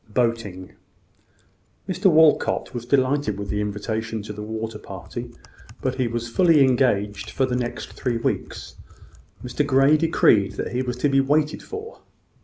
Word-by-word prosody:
BOATING. 115 -6 -2 1.1
Mr 190 +1 +2
Walcot 160 -3 +3
was 120 -1 -6
delighted 130 -4 +1
with 100 -1 -6
the 105 - -1
invitation 110 +1 -3
to 105 - -7
the 105 - -8
water 110 0 -5
party, 110 +6 -8 0.5
but 130 0 -3
was 120 0 -3
fully 155 +4 +4
engaged 105 -6 +1
for 135 - 0
the 125 -1 -2
next 120 -1 -4
three 120 -3 -2
weeks. 115 - -4 0.7
Mr 125 +4 -1
Grey 140 +2 +4
decreed 115 -10 +3
that - - -4
he 125 - -1
was 125 -1 -3
to 135 - +1
be 135 0 +4
waited 150 +2 +1
for. 435 +2 -8
120 Hz, 150 wpm, -23 LUFS, 105-140 Hz, 1.1 s, fully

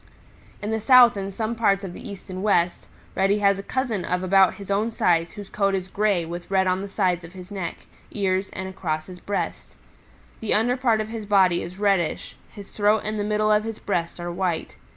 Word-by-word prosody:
"In 210 - -2
the 220 - 0
South 245 +1 +7
and 195 0 -4
some 220 +3 -2
parts 205 -4 +2
of 185 -2 -6
the - - -9
East 195 -2 -10
and 185 0 -5
West, 180 -4 +1 0.3
Reddy 195 +2 +2
has 200 -1 +3
a - - -3
cousin 230 -3 -2
of 180 0 -1
about 190 0 +4
his 200 -1 -8
own 210 +3 +1
size 170 -6 +1
whose 205 -2 -8
coat 195 -1 0
is 185 -1 -4
gray 200 -4 +1
with 175 +1 -7
red 190 -1 +2
on 185 0 +1
the 200 - -5
sides 185 -3 0
of 165 +1 -11
his 185 +1 -11
neck, 190 -4 -5 0.2
ears 190 -1 -1
and 190 0 -5
across 160 -5 -3
his 180 +1 -11
breast. 200 +3 -4 0.6
The 220 - 0
under 240 +3 +2
part 235 -4 +2
of 215 - -5
his 220 -2 -6
body 190 -4 +4
is 175 +2 -8
reddish, 195 -6 0 0.2
his 200 -2 -11
throat 210 +1 +2
and 215 0 -2
the - - 0
middle 215 0 +1
of 210 0 +3
his 225 -1 -5
breast 170 -3 -2
are 175 0 -4
white. 175 -2 -2
195 Hz, 220 wpm, -24 LUFS, 185-210 Hz, 0.6 s, South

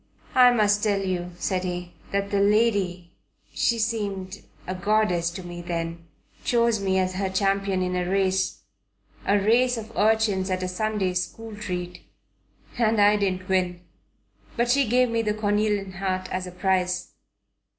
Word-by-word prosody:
"I 250 -1 +7
must 210 -3 +2
tell 205 -2 +2
you," 180 -1 -2
said 185 0 -1
he, 180 -1 -4 0.2
"that 200 0 -1
the 200 - +2
lady 200 -4 +2 0.4
she 235 - +1
seemed 200 -4 -3 0.2
a 185 - -3
goddess 185 -3 +1
to 175 +2 -8
me 175 0 -7
then 170 -1 -4 0.4
chose 235 -2 +2
me 190 -1 0
as 185 0 +1
her 190 +1 -1
champion 195 0 0
in 180 0 -2
a 180 0 -1
race, 190 -1 0 0.6
a 205 - +4
race 240 +5 +3
of 225 0 -8
urchins 210 -3 +2
at 185 0 -1
a - - -1
Sunday 195 0 -1
school 215 +5 -4
treat, 180 -4 -5 0.8
and 225 -2 +3
I 205 +1 +6
didn't 185 -3 -1
win. 180 -2 0 0.8
But 240 +1 +2
she 275 -1 +3
gave 250 0 +3
me 230 0 +1
the 210 -1 -1
cornelian 205 -2 0
heart 185 0 -2
as 185 0 -3
a - - -7
prize." 180 0 0
195 Hz, 160 wpm, -25 LUFS, 185-215 Hz, 0.8 s, I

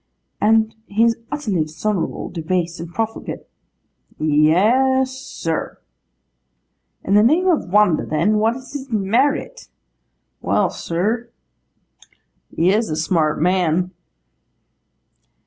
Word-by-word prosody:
'And 220 +1 +3
he 215 +3 +1
is 230 0 +3
utterly 220 - -1
dishonourable, 160 +5 -3
debased, 170 0 -2
and 170 0 -7
profligate?' 225 +4 -4 0.7
'Yes, 215 - +3
sir.' 215 -11 -5 1.3
'In 195 - -1
the 205 - +6
name 310 +12 +3
of 320 - +1
wonder, 205 -5 +4
then, 210 +8 +1
what 225 +2 +2
is 260 +1 -11
his 275 -2 -6
merit?' 255 - 0 0.7
'Well, - - +1
sir, 220 +8 -2 1.2
he 175 +3 +2
is 220 -1 0
a 155 - -2
smart 155 -1 0
man. 180 +1 +1
210 Hz, 105 wpm, -20 LUFS, 170-235 Hz, 1.3 s, the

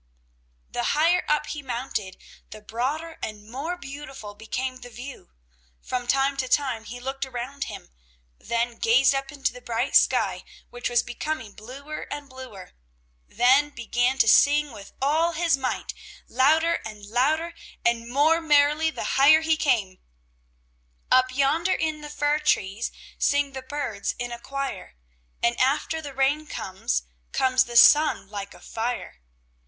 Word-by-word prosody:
The - - -2 0.2
higher 340 +4 +4
up 300 0 +2
he 300 - -5
mounted, 240 -7 -4 0.3
the 215 - -10
broader 270 +10 -4
and 210 -1 -6
more 285 +10 -4
beautiful 270 -8 -9
became 255 +5 -4
the 245 -1 -11
view. 250 +3 -10 0.5
From 250 -1 -4
time 275 +2 +2
to 260 -1 -1
time 255 -5 0
he 245 +3 -8
looked 270 +2 -4
around 265 +1 -5
him, - - -9 0.5
then 235 0 -2
gazed 255 +5 +4
up 270 +1 -3
into 275 -4 -2
the 250 - -11
bright 240 +2 -2
sky, - - +3 0.3
which 245 0 -3
was 240 -1 +2
becoming 300 -4 -4
bluer 275 +7 -8
and 290 -1 -5
bluer, 260 -8 -11 0.6
then 265 +4 +4
began 245 0 0
to 245 - +4
sing 290 +5 +5
with 200 -4 -11
all 320 +4 +2
his 335 -1 +2
might, 265 -2 -3 0.3
louder 320 +6 +3
and 210 -2 -9
louder 305 +10 +1 0.3
and 235 0 +1
more 305 +6 +3
merrily 300 0 +4
the - - -5 0.2
higher 310 +3 +7
he 320 0 +2
came: 230 -12 0 1.1
"Up 255 0 +5
yonder 285 +7 +2
in 315 -1 -2
the 295 - -8
fir 295 +1 +1
trees, 225 -7 0 0.3
Sing 285 -1 +2
the 265 -1 -6
birds 260 -7 -3
in 245 0 -4
a 235 - -6
choir, 275 - -5 0.5
And 235 0 +3
after 285 +4 +1
the 285 -3 -8
rain 285 +3 +1
comes, 185 - -2 0.3
Comes 260 0 +3
the 240 0 -1
sun 300 -3 +6
like 200 -1 -6
a - - -15
fire. 230 - -4
265 Hz, 150 wpm, -25 LUFS, 235-295 Hz, 1.1 s, higher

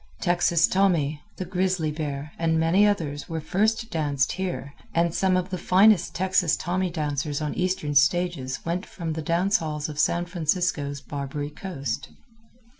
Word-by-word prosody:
Texas 175 -1 +3
Tommy, 165 -7 +1 0.2
the 185 - -4
Grizzly 180 -3 0
Bear, 150 -1 -4
and 160 -1 +2
many 175 +6 +4
others 150 -8 -2
were 165 -1 -2
first 215 +8 0
danced 145 -4 0
here, 180 -7 -4 0.2
and 170 0 +2
some 185 0 +2
of 185 +1 -2
the 185 - -3
finest 190 -2 +4
Texas 180 -1 +2
Tommy 185 +1 -1
dancers 145 -3 -2
on 150 -1 -2
eastern 180 -5 -1
stages 145 -2 +1
went 175 +3 -1
from 165 -6 -5
the 160 - -4
dance 175 +5 +2
halls 155 -1 -4
of 150 -1 -6
San 170 +3 +2
Francisco's 160 -5 -1
Barbary 145 +1 -5
Coast. 150 -4 -5
165 Hz, 155 wpm, -25 LUFS, 150-185 Hz, 0.2 s, many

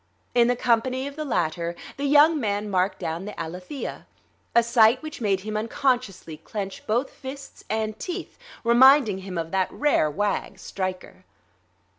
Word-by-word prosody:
In 240 -1 +5
the 245 - +2
company 250 +2 +1
of 280 0 -6
the 310 - -4
latter 170 - -1 0.2
the 280 - -3
young 295 +3 +5
man 205 -3 -2
marked 185 +1 +1
down 165 +4 -4
the 210 - -8
Alethea; 180 - -6 0.5
a 235 - +6
sight 235 +2 +4
which 310 -5 -7
made 195 -4 +1
him 215 +2 -5
unconsciously 220 - -1
clench 195 +4 -6
both 240 +5 0
fists 270 +1 -10
and 215 0 -2
teeth, 365 -1 -5 0.3
reminding 240 -3 +6
him 190 -2 -7
of 165 -1 -3
that 190 -1 0
rare 290 - +2
wag, 200 +6 -2
Stryker.... 185 -1 -5
220 Hz, 155 wpm, -25 LUFS, 190-260 Hz, 0.5 s, a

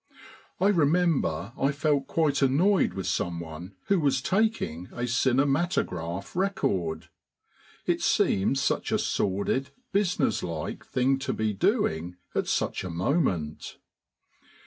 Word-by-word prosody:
I 195 - +4
remember 155 - +1
I 135 - +1
felt 140 -1 0
quite 150 -4 +1
annoyed 170 +9 +3
with 95 -2 -4
someone 85 +1 -3
who 195 -2 +2
was 140 -4 +2
taking 185 - 0
a 120 - -3
cinematograph 130 - 0
record. 100 - -1 0.8
It - - 0
seemed 100 +8 +2
such 135 - 0
a - - +3
sordid, 100 +7 0 0.2
business 180 - +1
like 85 -3 -4
thing 135 +2 +1
to 135 - -2
be 110 -1 -1
doing 85 -2 0 0.2
at - - -1
such - - -1
a 95 - -4
moment. 85 - -1
130 Hz, 120 wpm, -27 LUFS, -, 0.8 s, I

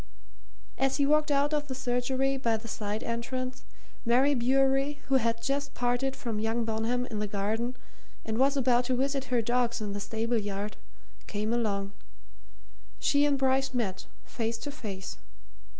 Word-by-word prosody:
As 270 0 +2
he 285 - +3
walked 300 +1 +3
out 285 +1 +2
of 295 -1 0
the 260 - -4
surgery 260 +1 0
by 235 -4 +1
the 225 +1 -9
side 210 +1 -3
entrance, 255 +2 -3 0.4
Mary 260 +4 +4
Bewery, 270 +3 +2
who 270 - +5
had 230 -1 0
just 280 +2 -1
parted 245 +2 0
from 225 -4 -3
young 225 +2 0
Bonham 225 +3 0
in 215 - -2
the 210 - -1
garden 215 +5 -1 0.5
and 220 +1 -1
was 275 +2 +4
about 250 -2 +3
to 255 0 +1
visit 275 +1 0
her 245 -2 +1
dogs 240 0 +1
in 210 -2 -3
the 205 - -3
stable 225 +3 0
yard, 205 0 -3 0.5
came 215 +2 -1
along: 200 -4 0 1.0
she 285 0 +3
and 285 -1 +2
Bryce 265 0 +2
met, 195 -6 -2 0.2
face 230 -1 -2
to 285 - -5
face. 205 -10 -6
245 Hz, 165 wpm, -29 LUFS, 225-270 Hz, 1.0 s, who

